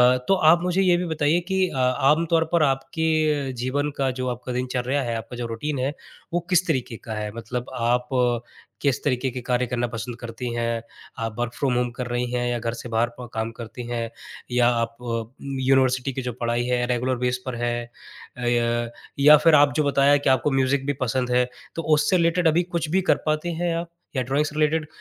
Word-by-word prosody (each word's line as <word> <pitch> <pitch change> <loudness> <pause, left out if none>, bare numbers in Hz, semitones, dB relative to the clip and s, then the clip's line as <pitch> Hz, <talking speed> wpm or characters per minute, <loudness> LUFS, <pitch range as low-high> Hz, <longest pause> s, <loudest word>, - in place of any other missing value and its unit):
अ, - - +1
तो 195 - +5 0.2
आप 170 +1 +6
मुझे 180 +2 +1
ये 180 -2 +4
भी 180 - -2
बताइए 160 +1 +1
कि 190 -1 +2
अ, 135 - -6
आमतौर 150 +6 +3
पर 165 -3 +4
आपके 150 0 +1
जीवन 145 +3 0
का 135 -1 +1
जो 130 - -1
आपका 125 +1 -5
दिनचर्या 125 +2 -1
है, 115 -1 -2
आपका 115 +2 -7
जो 120 - -3
रूटीन 130 +5 -3
है, 135 +3 -1 0.4
वो 175 - +2
किस 180 0 +3
तरीके 130 -6 -1
का 110 - -5
है? 105 -1 -3
मतलब 120 +2 -5
आप 125 +1 0 0.7
किस 140 -3 +1
तरीके 130 -1 0
के 125 0 -5
कार्य 125 0 +2
करना 120 0 -1
पसंद 115 +1 -4
करती 120 +1 -5
हैं? 115 -1 -1 0.4
आप 115 -1 -3
वर्क 120 0 -2
फ्रॉम 135 -3 0
होम 125 0 +1
कर 125 0 -5
रही 120 0 -1
हैं 125 0 0
या 120 -1 -1
घर 115 0 -2
से 120 +1 -7
बाहर 115 +1 +1
प 125 - -7
काम 110 0 -2
करती 120 +1 -8
हैं? 115 -1 -2 0.4
या 120 0 +4
आप 115 -1 -1
अ, 115 0 -4 0.3
यूनिवर्सिटी 130 0 +2
की 130 - -3
जो 125 -1 -4
पढ़ाई 120 0 0
है 125 -1 +1
रेगुलर 125 +1 0
बेस 125 0 +1
पर 130 -2 -3
है? 120 0 -1 0.5
अ, - - -7
य 120 0 +1 0.3
या 150 +2 +8
फिर 155 +1 +5
आप 145 0 +5
जो 155 - +2
बताया 140 0 +4
कि 140 - 0
आपको 130 +2 +3
म्यूज़िक 135 +1 +1
भी 145 - 0
पसंद 125 0 0
है 125 0 +3 0.3
तो 165 - -2
उससे 180 +5 +2
रिलेटेड 170 +1 +2
अभी 165 +3 +3
कुछ 155 -2 -2
भी 190 +3 +2
कर - - +5
पाती 155 +3 0
हैं 170 0 -1
आप, 170 0 -3 0.3
या 130 - +1
ड्राइंग 140 +4 +1
से 150 - -6
रिलेटेड? 155 0 +2
130 Hz, 220 wpm, -24 LUFS, 120-150 Hz, 0.7 s, या